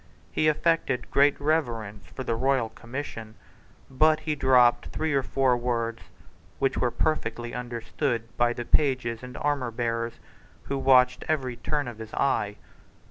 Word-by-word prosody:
He 155 - +1
affected 155 -5 +1
great 140 +1 +4
reverence 120 -9 -1
for 130 - -7
the 115 - -1
royal 130 -1 +1
commission, 115 -2 -7 0.5
but 155 +3 +3
he 155 -1 -1
dropped 130 -4 +4
three 160 -1 -2
or 135 - +3
four 130 -1 +2
words 115 -1 -2 0.6
which 135 -1 +1
were 125 - +1
perfectly 120 -4 -2
understood 120 0 -3
by 120 0 +2
the 120 0 -5
pages 125 -6 +1
and 125 0 -9
armourbearers, 120 -5 -1 0.5
who 140 - -3
watched 130 -1 +4
every 130 -6 -1
turn 145 +3 -2
of 115 -2 -8
his 110 -1 -8
eye. 105 -7 +1
125 Hz, 140 wpm, -26 LUFS, 115-140 Hz, 0.6 s, great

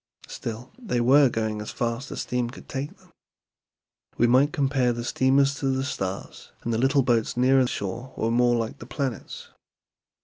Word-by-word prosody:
Still 115 +2 -6
they 210 - -1
were 135 +3 +6
going 110 -2 -2
as 105 - -6
fast 120 +3 -3
as - - -4
steam 125 -1 -1
could 125 - -12
take 135 +2 -5
them. - - -24 1.1
We 120 - +4
might 130 +5 +4
compare 135 -5 +1
the 120 0 -4
steamers 135 +3 +3
to 135 - -1
the 130 0 0
stars, 95 -8 -5
and 115 - -1
the 110 - 0
little 135 +2 +3
boats 120 -2 +1
nearer 130 +1 +4
shore 115 +5 -4
were 115 - 0
more 120 0 +3
like 115 -1 -3
the 115 - -10
planets. 130 -1 -5
125 Hz, 175 wpm, -25 LUFS, 115-135 Hz, 1.1 s, were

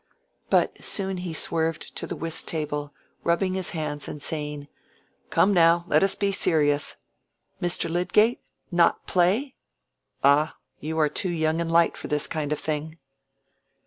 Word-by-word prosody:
But - - +1
soon 190 -2 +1
he 180 -1 -4
swerved 160 0 -1
to - - -4
the - - -4
whist 165 -1 -2
table, 150 -2 -2 0.3
rubbing 185 +2 +1
his 190 -1 -1
hands 150 -3 -3
and 150 - -6
saying, 150 -1 -3 0.6
"Come 200 - +3
now, 170 -1 +4
let - - +3
us 195 0 +2
be 200 -1 0
serious! 150 -6 +2 0.7
Mr. 175 -1 0
Lydgate? 195 +7 +2 0.3
not 175 -1 +2
play? 200 +10 +1 0.7
Ah! 145 +3 +4 0.2
you 160 +2 -4
are 155 - +4
too 185 +5 -2
young 160 -1 0
and 165 0 -2
light 170 0 +4
for - - -6
this 150 -1 0
kind 150 -2 -3
of 150 - 0
thing." 155 +1 -4
165 Hz, 150 wpm, -25 LUFS, 150-180 Hz, 0.7 s, now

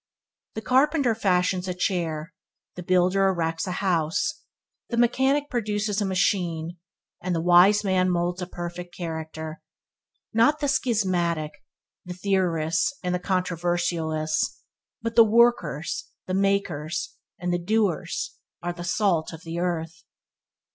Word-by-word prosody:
The 220 - -5
carpenter 270 -1 +3
fashions 185 -3 +1
a 180 - -2
chair; 170 -3 -2 0.4
the 180 - -7
builder 185 +2 +3
erects 165 -1 -1
a 180 - -2
house; 185 +3 0 0.5
the 235 - -2
mechanic 265 +4 +2
produces 210 -3 -1
a - - +1
machine; 175 -3 0 0.4
and 180 -1 -1
the - - 0
wise 180 +5 +6
man 185 -2 +2
moulds 175 +1 -1
a 180 - -3
perfect 175 0 -7
character. 160 -2 -5 0.7
Not 235 +7 +4
the 290 - 0
schismatic, 180 - 0 0.5
the 180 0 -7
theorists 180 - 0
and 180 0 -1
the 180 - 0
controversialists, 175 -4 -1 0.4
but 230 0 -3
the 230 - +9
workers, 220 -9 +2 0.2
the 185 - -4
makers, 185 -5 -1 0.2
and 180 0 -2
the 175 - +1
doers 190 -2 -1 0.2
are 175 0 -2
the 175 0 -7
salt 175 -2 +1
of 160 +1 -10
the 165 +1 -4
earth. 165 -3 -3
180 Hz, 130 wpm, -25 LUFS, 170-205 Hz, 0.7 s, the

